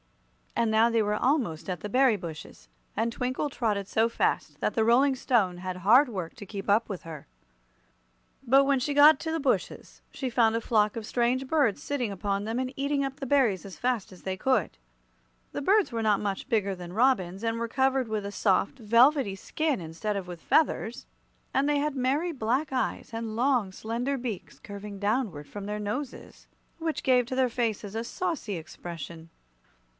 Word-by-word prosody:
And 230 - +2
now 220 +2 +4
they 230 -1 +2
were 210 0 0
almost 225 - 0
at 180 -2 -2
the 210 - -5
berry 255 -1 +4
bushes, 155 - -9 0.3
and 230 +2 +1
Twinkle 255 +4 -2
trotted 210 -7 -1
so 225 +3 +2
fast 230 - -1
that - - 0
the 225 - +2
Rolling 260 +4 +4
Stone 210 -9 +1
had 185 0 -4
hard 240 +10 +5
work 185 -7 -5
to 215 - -9
keep 200 0 -6
up 215 +3 +3
with 195 -4 -5
her. 160 -4 -9 1.2
But 270 +2 +5
when 275 -1 +2
she 285 +3 -2
got 290 0 +8
to 320 - -3
the 325 - -1
bushes 275 -3 -2
she 265 - -3
found 230 -2 +3
a 230 - 0
flock 215 -2 +2
of 225 -2 -5
strange 250 +3 0
birds 270 -9 +2
sitting 255 -7 -2
upon 200 +1 -2
them 225 +3 -2
and 260 0 -3
eating 280 0 0
up 270 0 -4
the 275 - -4
berries 245 -9 +2
as 195 -2 -10
fast 245 -6 -1
as 185 - -14
they 190 -1 -2
could. 225 -2 0 0.7
The - - -4
birds 400 +4 +3
were 230 -1 -2
not 210 -2 +3
much 200 +4 -3
bigger 200 -5 +1
than 175 -1 -9
robins, 205 -5 +1
and 230 0 0
were 235 0 -2
covered 265 +1 +1
with 215 -2 -3
a 200 - -4
soft, 200 +5 +1
velvety 235 0 +4
skin 305 +7 -1
instead 170 +6 -3
of 190 -2 -5
with 175 -2 -8
feathers, 265 -5 +1 0.5
and 275 +2 +2
they 295 - +2
had 295 0 -1
merry 275 +7 0
black 265 +2 -1
eyes 255 - -2
and 225 -1 -4
long, 245 -5 +2
slender 235 +7 -2
beaks 235 -7 -6
curving 200 0 -8
downward 205 - -1
from 205 -1 -7
their 210 +1 -3
noses, 245 +7 -6 0.3
which 325 -1 -2
gave 250 -2 +4
to 255 - -3
their 260 -1 +2
faces 220 -4 -2
a 225 - -1
saucy 235 - -3
expression. 165 0 -8
230 Hz, 190 wpm, -28 LUFS, 200-265 Hz, 1.2 s, got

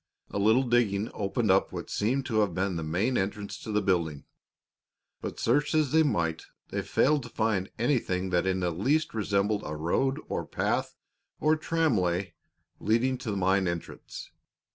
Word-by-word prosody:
A - - -2
little 110 +6 +4
digging 115 -4 +1
opened 100 -1 0
up - - +3
what - - -6
seemed 130 +6 0
to 110 -4 0
have 100 -6 +1
been 95 0 0
the 80 - -2
main 95 +11 0
entrance 100 +1 -3
to 110 - -6
the 105 0 +1
building, 85 -6 0 1.0
but, - - -5
search 145 +6 +2
as 155 -4 +2
they 160 - +5
might, 85 - 0 0.2
they - - -2
failed 150 +1 +2
to 120 - -9
find 110 -5 0
anything 100 -7 0
that 90 +1 +2
in 95 0 0
the 90 -1 0
least 140 - +1
resembled 105 -1 0
a 75 - -4
road 130 - 0
or - - -2
path - - -1 0.4
or 155 +1 +3
tramway 100 - 0 0.5
leading 120 +4 +2
to 120 - -5
the 100 - -1
mine 95 0 +2
entrance. 85 -1 -6
105 Hz, 170 wpm, -28 LUFS, 95-125 Hz, 1.0 s, they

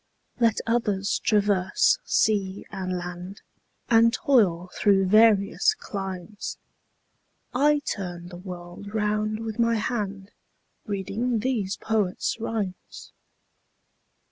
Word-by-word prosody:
Let 230 -2 +3
others 210 -4 0
traverse 205 - +3
sea 200 - +1
and 185 -2 -3
land, 180 +2 -7 0.4
And 230 0 +5
toil 190 -10 +2
through 195 -2 +3
various 215 - +4
climes, 195 - -6 1.0
30 260 +3 +2
I 295 0 +5
turn 175 -3 -4
the 175 - -9
world 180 +2 -9
round 215 0 0
with 225 0 -5
my 230 0 +3
hand 205 -3 -3 0.6
Reading 215 +4 -1
these 220 -6 -1
poets' 215 0 -1
rhymes. 215 -5 -5
205 Hz, 100 wpm, -25 LUFS, 190-225 Hz, 1.0 s, And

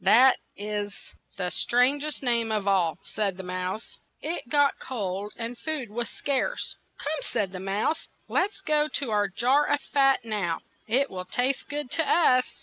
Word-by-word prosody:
"That 260 +3 +7 0.2
is 205 0 -3 0.4
the 180 -2 -1
stran 250 +4 +3
gest 300 -1 -3
name 235 -3 +2
of 210 -2 -1
all," 180 -5 +3
said 200 -4 -2
the 190 - -6
mouse. 185 +4 -4 0.2
It 310 -5 -4
got 285 -1 +3
cold, 205 -4 -3
and 235 +1 -4
food 300 -9 -3
was 235 +2 -2
scarce. 285 - -1 0.2
"Come," 305 +2 -3
said 195 -3 0
the 185 - -6
mouse, 200 - -1 0.2
"let 380 - +2
us 395 - -15
go 300 -4 +2
to 275 -5 -2
our 205 -1 +3
jar 255 +9 +3
of 290 - +2
fat 270 -3 +2
now; 195 -7 -1 0.3
it 265 +5 +2
will 185 -1 -5
taste 255 +7 0
good 290 -3 -3
to 325 - +2
us." 255 -7 +5
235 Hz, 175 wpm, -27 LUFS, 200-280 Hz, 0.4 s, That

